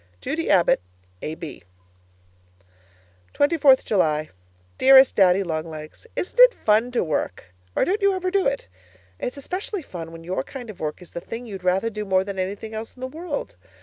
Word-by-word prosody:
Judy 320 Hz, -, -3 dB
Abbott, 175 Hz, -, +4 dB, 0.4 s
A.B. 155 Hz, -1 st, -6 dB, 1.7 s
24th 285 Hz, -3 st, +4 dB
July 155 Hz, -6 st, +1 dB, 0.5 s
Dearest 265 Hz, 0 st, +8 dB
Daddy 190 Hz, 0 st, +5 dB
Long 160 Hz, -2 st, -3 dB
Legs, 155 Hz, -, -10 dB
Isn't 380 Hz, -, -4 dB
it -, -, +8 dB
fun 220 Hz, +3 st, +2 dB
to 245 Hz, -, +2 dB
work 120 Hz, -, -3 dB, 0.2 s
or -, -, +3 dB
don't 405 Hz, +4 st, 0 dB
you 400 Hz, -1 st, +3 dB
ever 370 Hz, 0 st, -2 dB
do 395 Hz, -4 st, +2 dB
it? 275 Hz, 0 st, -2 dB, 0.5 s
It's 250 Hz, -, -4 dB
especially 365 Hz, +5 st, -4 dB
fun 165 Hz, -8 st, -8 dB
when 165 Hz, 0 st, -11 dB
your 175 Hz, -4 st, -2 dB
kind 245 Hz, -, -8 dB
of 195 Hz, -, -17 dB
work 155 Hz, +3 st, -4 dB
is 175 Hz, -, -16 dB
the 170 Hz, -, -6 dB
thing 230 Hz, +6 st, -7 dB
you'd 195 Hz, -5 st, -8 dB
rather 190 Hz, +5 st, +1 dB
do 210 Hz, 0 st, -4 dB
more 190 Hz, -2 st, +2 dB
than 195 Hz, -1 st, -5 dB
anything 200 Hz, +4 st, -4 dB
else 220 Hz, +1 st, -6 dB
in -, -, -18 dB
the -, -, -2 dB
world. 310 Hz, -, -5 dB
210 Hz, 180 wpm, -23 LUFS, 175-280 Hz, 1.7 s, Dearest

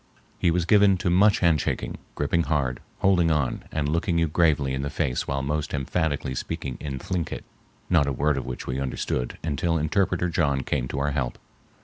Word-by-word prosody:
He 85 Hz, -, +3 dB
was 85 Hz, 0 st, +1 dB
given 100 Hz, 0 st, +5 dB
to 90 Hz, 0 st, 0 dB
much 100 Hz, +3 st, +4 dB
handshaking, 85 Hz, -4 st, +1 dB, 0.2 s
gripping 75 Hz, +4 st, +1 dB
hard, 65 Hz, -6 st, 0 dB, 0.2 s
holding 90 Hz, -3 st, +4 dB
on 75 Hz, -5 st, 0 dB
and 75 Hz, -2 st, -1 dB
looking 85 Hz, +3 st, 0 dB
you 85 Hz, 0 st, +3 dB
gravely 75 Hz, -4 st, +2 dB
in 65 Hz, -, -2 dB
the 70 Hz, -, -2 dB
face 65 Hz, -2 st, -1 dB
while 70 Hz, -1 st, -1 dB
most 75 Hz, +1 st, -2 dB
emphatically 70 Hz, -1 st, -1 dB
speaking 65 Hz, 0 st, -4 dB
in 70 Hz, -3 st, -4 dB
Thlinkit, 85 Hz, +4 st, -3 dB, 0.4 s
not 80 Hz, -6 st, +3 dB
a -, -, +1 dB
word 75 Hz, +3 st, +1 dB
of 70 Hz, -, -2 dB
which 60 Hz, -, -5 dB
we 65 Hz, +1 st, -2 dB
understood 65 Hz, -2 st, -2 dB
until 80 Hz, +2 st, 0 dB
interpreter 90 Hz, +3 st, +1 dB
John 75 Hz, -5 st, +1 dB
came 65 Hz, -1 st, -1 dB
to -, -, -5 dB
our 70 Hz, +1 st, 0 dB
help. 65 Hz, -4 st, -2 dB
75 Hz, 190 wpm, -25 LUFS, 70-85 Hz, 0.4 s, given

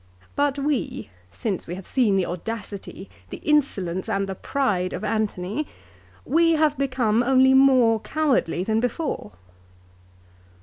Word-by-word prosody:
But 285 Hz, -1 st, +1 dB
we, 280 Hz, -, -2 dB, 0.2 s
since 200 Hz, -6 st, -4 dB
we 175 Hz, -, -4 dB
have 190 Hz, -1 st, -9 dB
seen 235 Hz, -7 st, +2 dB
the 190 Hz, -2 st, +2 dB
audacity, 200 Hz, -, -6 dB, 0.2 s
the -, -, -6 dB
insolence, 195 Hz, -, 0 dB
and 195 Hz, 0 st, 0 dB
the 190 Hz, -, -3 dB
pride 190 Hz, -5 st, -1 dB
of -, -, -5 dB
Antony, 215 Hz, +4 st, -2 dB, 0.6 s
we 330 Hz, +3 st, +3 dB
have 310 Hz, -2 st, +2 dB
become 255 Hz, -5 st, +1 dB
only 265 Hz, +1 st, +4 dB
more 255 Hz, -4 st, +5 dB
cowardly 260 Hz, -, 0 dB
than 220 Hz, +2 st, +1 dB
before." 245 Hz, -, -3 dB
230 Hz, 130 wpm, -24 LUFS, 195-275 Hz, 0.6 s, more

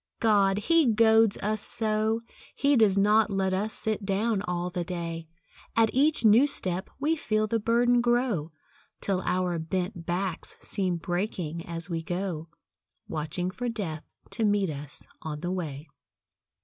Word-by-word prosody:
God! 200 Hz, -3 st, +3 dB
he 325 Hz, +7 st, +3 dB
goads 220 Hz, -1 st, +4 dB
us 215 Hz, 0 st, 0 dB
so! 220 Hz, 0 st, 0 dB, 0.3 s
He 285 Hz, 0 st, +3 dB
does 215 Hz, -5 st, +4 dB
not 210 Hz, +2 st, +4 dB
let 190 Hz, -1 st, 0 dB
us 205 Hz, +3 st, -1 dB
sit 215 Hz, -1 st, -2 dB
down 200 Hz, +2 st, 0 dB
all 180 Hz, -3 st, -3 dB
the 175 Hz, -1 st, -2 dB
day. 170 Hz, -2 st, -5 dB, 0.5 s
At 225 Hz, -1 st, +4 dB
each 285 Hz, -2 st, +3 dB
new 225 Hz, +7 st, +7 dB
step 185 Hz, -9 st, -2 dB
we 305 Hz, +4 st, +2 dB
feel 215 Hz, -8 st, 0 dB
the 225 Hz, +1 st, 0 dB
burden 240 Hz, +2 st, +3 dB
grow, 240 Hz, -, +1 dB, 0.5 s
Till 190 Hz, -2 st, -1 dB
our 180 Hz, -2 st, 0 dB
bent 180 Hz, +2 st, -3 dB
backs 180 Hz, 0 st, -3 dB
seem 185 Hz, -4 st, -1 dB
breaking 175 Hz, -2 st, -3 dB
as 170 Hz, +1 st, -2 dB
we 165 Hz, -3 st, -2 dB
go, 175 Hz, -2 st, -3 dB, 0.6 s
Watching 160 Hz, +4 st, -2 dB
for 245 Hz, +4 st, -3 dB
Death 180 Hz, -9 st, -4 dB, 0.3 s
to 230 Hz, -, -1 dB
meet 205 Hz, -4 st, +2 dB
us 145 Hz, 0 st, -7 dB, 0.2 s
on 150 Hz, -1 st, -5 dB
the 175 Hz, -, -2 dB
way. 155 Hz, -5 st, -4 dB
195 Hz, 150 wpm, -27 LUFS, 175-220 Hz, 0.6 s, new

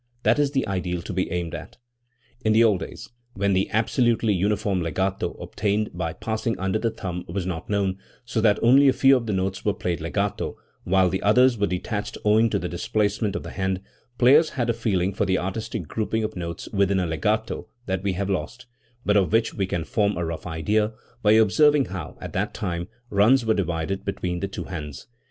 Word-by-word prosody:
That -, -, +3 dB
is 145 Hz, -1 st, +3 dB
the 135 Hz, -1 st, -1 dB
ideal 90 Hz, -3 st, -2 dB
to 100 Hz, -, -5 dB
be 95 Hz, +1 st, -1 dB
aimed 85 Hz, -1 st, -3 dB
at. -, -, -8 dB, 0.7 s
In 110 Hz, -, +3 dB
the 115 Hz, +1 st, +6 dB
old 105 Hz, -5 st, +4 dB
days, -, -, -8 dB, 0.3 s
when 100 Hz, 0 st, +1 dB
the 95 Hz, +1 st, +1 dB
absolutely 115 Hz, 0 st, +2 dB
uniform 100 Hz, 0 st, 0 dB
legato 95 Hz, +4 st, -1 dB
obtainable 105 Hz, -1 st, -2 dB
by 85 Hz, -2 st, -2 dB
passing 110 Hz, +3 st, -2 dB
under 95 Hz, +3 st, -1 dB
the 115 Hz, -, +1 dB
thumb 90 Hz, -5 st, -5 dB
was 90 Hz, +1 st, -3 dB
not 90 Hz, -2 st, -5 dB
known, 100 Hz, -2 st, 0 dB, 0.3 s
so 120 Hz, -2 st, -1 dB
that 105 Hz, -2 st, +4 dB
only 135 Hz, +4 st, +6 dB
a 135 Hz, -, +5 dB
few 135 Hz, +1 st, +5 dB
of 120 Hz, -3 st, -1 dB
the -, -, 0 dB
notes 95 Hz, 0 st, -2 dB
were 105 Hz, -1 st, +1 dB
played 90 Hz, -3 st, -2 dB
legato -, -, -2 dB, 0.3 s
while 95 Hz, 0 st, +4 dB
the 95 Hz, +2 st, -1 dB
others 125 Hz, +4 st, +5 dB
were 100 Hz, -2 st, 0 dB
detached 100 Hz, +3 st, -3 dB
owing 110 Hz, +2 st, +4 dB
to 105 Hz, -, 0 dB
the 90 Hz, -, -3 dB
displacement 105 Hz, +3 st, -1 dB
of -, -, -3 dB
the -, -, -7 dB
hand, 95 Hz, 0 st, -1 dB, 0.4 s
players 145 Hz, +6 st, +6 dB
had 120 Hz, -2 st, +1 dB
a -, -, -1 dB
feeling 100 Hz, -5 st, 0 dB
for -, -, 0 dB
the 95 Hz, -1 st, +2 dB
artistic 95 Hz, -1 st, -4 dB
grouping 110 Hz, +3 st, -1 dB
of 110 Hz, 0 st, -3 dB
notes 85 Hz, -2 st, -5 dB
within 100 Hz, -1 st, +2 dB
a 90 Hz, -, 0 dB
legato 105 Hz, +8 st, -1 dB, 0.2 s
that 95 Hz, -1 st, -2 dB
we 100 Hz, -1 st, 0 dB
have 95 Hz, +2 st, -2 dB
lost, 100 Hz, +5 st, -3 dB, 0.4 s
but 105 Hz, -, +3 dB
of 100 Hz, -3 st, +3 dB
which 115 Hz, +1 st, +2 dB
we 95 Hz, -2 st, -1 dB
can 85 Hz, -3 st, -2 dB
form 100 Hz, +3 st, 0 dB
a 85 Hz, -, -1 dB
rough 80 Hz, +1 st, -5 dB
idea 105 Hz, +7 st, 0 dB, 0.3 s
by 105 Hz, -1 st, +5 dB
observing 140 Hz, +7 st, +5 dB
how, 95 Hz, -2 st, -7 dB
at -, -, -7 dB
that -, -, -2 dB
time, 85 Hz, -3 st, -3 dB, 0.2 s
runs 115 Hz, +5 st, +4 dB
were 110 Hz, -, +3 dB
divided 85 Hz, -1 st, -2 dB
between 90 Hz, -3 st, -3 dB
the 100 Hz, -, -2 dB
two 95 Hz, -, -6 dB
hands. 75 Hz, -6 st, -7 dB
100 Hz, 210 wpm, -24 LUFS, 90-110 Hz, 0.7 s, the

